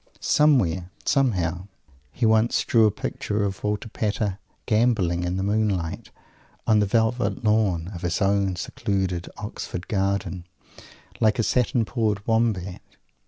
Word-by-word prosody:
Somewhere, 95 - +2 0.2
somehow, 95 - +1 0.4
he 120 - -1
once 110 +1 +3
drew 115 -2 +5
a - - +4
picture 105 +1 -3
of 100 -1 -3
Walter 105 +1 -1
Pater 105 -2 -2 0.3
"gambolling," 105 -7 +2
in 90 +1 -2
the 95 - -1
moonlight, 100 -5 -1 0.6
on 110 -1 +4
the 105 - +2
velvet 115 +4 0
lawn 100 -5 +1
of 85 - -7
his 90 -1 -1
own 100 -1 +1
secluded 95 -2 -2
Oxford 90 +1 -6
garden, 95 -3 -1 0.7
like 110 -1 +3
a 115 - +1
satin 120 0 +1
pawed 105 -3 -1
Wombat! 110 -5 0
100 Hz, 130 wpm, -24 LUFS, 95-110 Hz, 0.7 s, drew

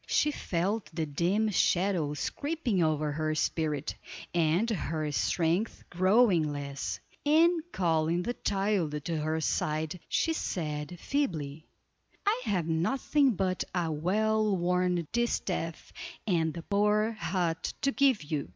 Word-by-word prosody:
She 300 - +2
felt 195 -2 -2
the 160 -1 -2
dim 175 +9 +1
shadows 175 -6 +1
creeping 285 - -1
over 155 -2 +1
her 155 +1 -1
spirit, 155 -2 -1 0.4
and 170 +5 +2
her 155 -8 -2
strength 170 +8 0
growing 185 -3 +4
less; 140 -1 -4 0.2
and 330 +3 +4
calling 165 -1 +1
the 240 - -2
child 195 - -1
to 165 -2 -1
her 155 +1 -1
side, 155 +2 -1
she 325 - +1
said, 155 - -3
feebly: 160 - -2 0.6
"I 440 +4 +2
have 180 -5 0
nothing 255 - +2
but 185 -1 0
a 170 -3 0
well 210 +6 +1
worn 180 -1 +1
distaff 190 -8 -2 0.3
and 165 -6 +1
the 170 - -6
poor 210 +3 +2
hut 180 -6 -1
to 275 - +2
give 270 - +3
you. 150 -2 -3
175 Hz, 125 wpm, -30 LUFS, 155-215 Hz, 0.6 s, growing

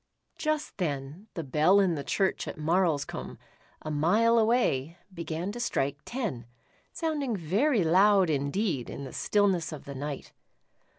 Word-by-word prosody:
Just 310 -1 -2
then, 150 +3 -3
the 165 - -3
bell 155 +8 +4
in 190 -3 +3
the 145 -3 -3
church 190 +5 0
at - - -6
Marlscombe, 160 -1 0 0.5
a 155 - -4
mile 210 +10 +3
away, 175 - +1 0.2
began 170 +2 -4
to 240 - -7
strike 140 - -1
ten, 210 - -4 0.4
sounding 295 -7 -2
very 200 - +2
loud 190 +3 +5
indeed 140 - -1
in 140 - -6
the 130 - -8
stillness 195 -6 +1
of 155 - -8
the 140 - -7
night. 140 +1 -6
175 Hz, 140 wpm, -28 LUFS, 145-210 Hz, 0.5 s, loud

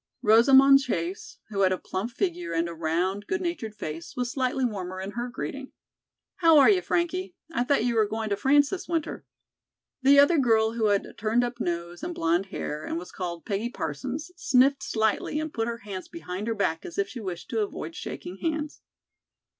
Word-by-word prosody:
Rosamond 265 +5 +7
Chase, 185 -8 -4
who 205 -2 -4
had 190 -1 +4
a 185 - +1
plump 190 +6 -4
figure 175 -7 -2
and 165 +1 +1
a 170 - -6
round, 175 +5 -1
good 390 - -1
natured 340 - -4
face, 160 -4 -7
was 245 -1 -2
slightly 260 0 0
warmer 185 -5 -4
in 190 +1 -5
her 240 +3 -4
greeting. 270 +2 -6 0.6
"How 330 -3 +6
are 285 - +8
you, 375 -2 +3
Frankie? 360 +2 -1 0.2
I 245 - +1
thought 250 -2 +2
you 240 - +1
were 220 -2 +3
going 220 +1 -3
to - - +3
France 285 +6 +3
this 380 - -4
winter." 330 -3 -3 0.8
The 275 +2 +6
other 285 +3 +6
girl 225 -3 +3
who 230 -1 -1
had 200 -1 +2
a - - -12
turned 225 +3 +1
up 240 0 -4
nose 170 -2 -3
and 350 0 -4
blonde 170 +4 +1
hair, 150 -5 -5
and - - -3
was 180 +1 -7
called 175 -2 -5
"Peggy 210 +3 -2
Parsons," 250 - -4
sniffed 275 -3 +3
slightly 220 +6 0
and 310 0 -4
put 225 0 -1
her 235 0 -3
hands 190 -3 -6
behind 210 - -6
her 230 - 0
back 180 -6 -1
as - - -9
if 200 - +1
she 245 +4 -8
wished 185 -5 -6
to 225 - 0
avoid 165 -5 -4
shaking 180 +2 -7
hands. 310 - -3
225 Hz, 200 wpm, -27 LUFS, 185-275 Hz, 0.8 s, are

